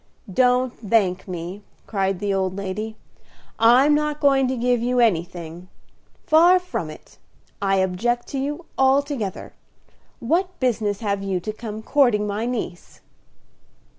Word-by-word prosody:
"Don't 250 +2 +3
thank 200 -4 +1
me," 180 +2 -6 0.2
cried 195 -2 -1
the 200 +1 -1
old 190 -1 -1
lady. 205 +3 -4 0.6
"I'm 250 +6 +6
not 300 0 0
going 275 -3 +3
to 260 0 -2
give 245 0 +1
you 250 +1 +1
anything, 175 -5 -1 0.6
far 340 +4 +6
from 360 0 -4
it. - - -14 0.4
I 195 -1 +2
object 195 +6 0
to 275 - -3
you 295 +5 -4
altogether. 265 -6 0 0.7
What 360 +9 -1
business 215 -5 0
have 200 -2 -1
you 195 -2 -1
to 215 +4 -4
come 215 -1 -7
courting 240 -6 +3
my 210 +3 -2
niece?" 225 -8 -5
225 Hz, 135 wpm, -22 LUFS, 195-265 Hz, 0.7 s, I'm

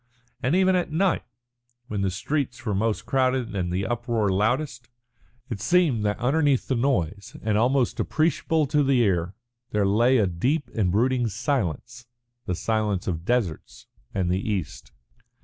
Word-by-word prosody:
And 135 +7 +1
even 190 0 +4
at 175 -3 -1
night, 180 +3 +1 0.7
when 105 -3 -3
the 95 - +1
streets 125 +4 -3
were 105 - 0
most 105 +2 -1
crowded 130 -4 0
and 90 -2 -1
the 95 +2 -1
uproar 120 -3 0
loudest, 120 +6 -1 0.6
it 115 -7 -5
seemed 160 -8 +2
that 105 0 0
underneath 140 +1 +1
the - - 0
noise, 105 - -1
and 105 -1 +1
almost 125 +3 +2
appreciable 160 0 +1
to 150 +2 +1
the 135 -2 +3
ear, 90 -3 0 0.3
there 105 -4 +1
lay 120 +6 +4
a 110 - +3
deep 125 - -1
and 100 -5 +1
brooding 120 +4 +2
silence, 120 - -3 0.4
the 90 - 0
silence 105 -1 -1
of 85 -2 -3
deserts 115 - -2 0.3
and 90 -3 -1
the 90 - +1
East. 100 -8 -4
115 Hz, 155 wpm, -25 LUFS, 100-135 Hz, 0.7 s, even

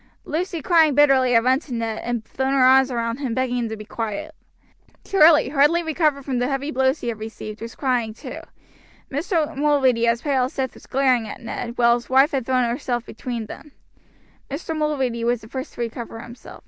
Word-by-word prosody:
Lucy 335 -1 -3
crying 320 -4 +4
bitterly 270 -3 +4
had 230 -1 +5
run 260 +2 +3
to 295 - -15
Ned 225 -1 -3
and 240 -2 -3
thrown 265 0 -2
her 265 - +4
arms 260 +1 +6
round 230 +1 -2
him, 255 -5 -3
begging 255 -1 0
him 230 -2 -2
to 220 - -5
be 215 - -9
quiet. 230 +9 -5 0.7
Charlie, 320 -7 +5
hardly 295 +5 +3
recovered 305 -4 0
from 260 -3 -1
the 245 - 0
heavy 275 +2 -2
blows 265 +2 +1
he 240 - -2
had 225 -2 -5
received, 215 0 -8
was 230 0 -7
crying 250 -5 0
too. - - -8 0.7
Mr. 310 +2 -1
Mulready 270 -5 +2
as 235 0 +1
pale 270 -4 +2
as 260 - -8
death 260 -2 -2
was - - -16
glaring 255 -4 +2
at - - -8
Ned, 235 0 -6
while 235 -1 +5
his 240 0 -3
wife 270 +3 +5
had 265 -5 -2
thrown 255 -2 +2
herself 240 -1 -2
between 235 -1 -5
them. 285 +7 -11 0.8
Mr. 315 +3 -4
Mulready 270 -6 -1
was 240 0 0
the 215 - -12
first 260 +3 -6
to - - -6
recover 230 -1 -5
himself. 235 +2 -11
260 Hz, 205 wpm, -22 LUFS, 235-285 Hz, 0.8 s, arms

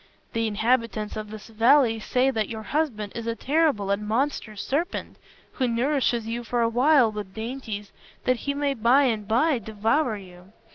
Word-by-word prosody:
The 230 0 0
inhabitants 220 0 0
of 215 -1 -5
this 215 0 -9
valley 230 +1 +4
say 255 +4 +1
that 220 -5 -1
your 220 -1 -6
husband 220 -6 -2
is 230 -1 -5
a 230 - -1
terrible 275 -9 +1
and 210 +1 -1
monstrous 225 -3 -1
serpent, 320 +6 -2 0.3
who 255 - -1
nourishes 240 -1 +1
you 235 +2 -4
for 235 +1 0
a 230 - +2
while 250 0 +4
with 205 -3 -7
dainties 220 -3 -5 0.3
that 255 -1 +2
he 280 +4 -3
may 285 -1 0
by 250 +3 +4
and 220 -6 0
by 255 +5 +2
devour 220 +4 0
you. 185 0 -14
230 Hz, 175 wpm, -25 LUFS, 215-265 Hz, 0.3 s, valley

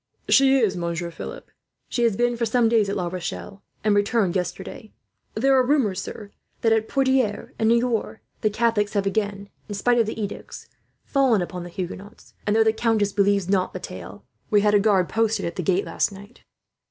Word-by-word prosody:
"She 270 0 +5
is, 215 -7 +2
Monsieur 170 0 -3
Philip. - - -9 0.4
She 240 - -2
has 230 -4 +2
been 240 0 +1
for 235 0 -1
some 235 +1 +3
days 225 -3 +3
at 200 - -2
La 185 -3 -1
Rochelle, 185 +2 -6 0.2
and 210 -1 +3
returned 205 -2 +1
yesterday. 185 +4 -4 0.4
There 270 +4 +3
are 260 - +5
rumours, 245 -9 +1
sir, 205 0 -8 0.3
that 225 -1 +3
at 220 0 +1
Poitiers 260 -6 +1
and 220 - +3
Niort 235 -2 0 0.2
the 215 - +2
Catholics 215 -1 +1
have 200 -2 0
again, 200 0 -2 0.2
in 205 - -4
spite 240 +4 +2
of 225 - +2
the 220 - -4
edicts, 205 -2 -6 0.4
fallen 260 -9 +2
upon 180 0 -6
the 175 - -8
Huguenots; 190 +4 -8
and 205 - +2
though 225 - +5
the 220 0 +3
countess 220 -3 +1
believes 200 -2 +2
not 190 -1 +1
the - - -5
tale, - - -9 0.2
we 205 -1 +4
had 210 0 +3
a 205 - +6
guard 195 -4 +3
posted 225 -1 0
at 170 - -4
the - - -2
gate 185 +2 +1
last - - 0
night." 200 +4 -14
210 Hz, 200 wpm, -24 LUFS, 195-230 Hz, 0.4 s, a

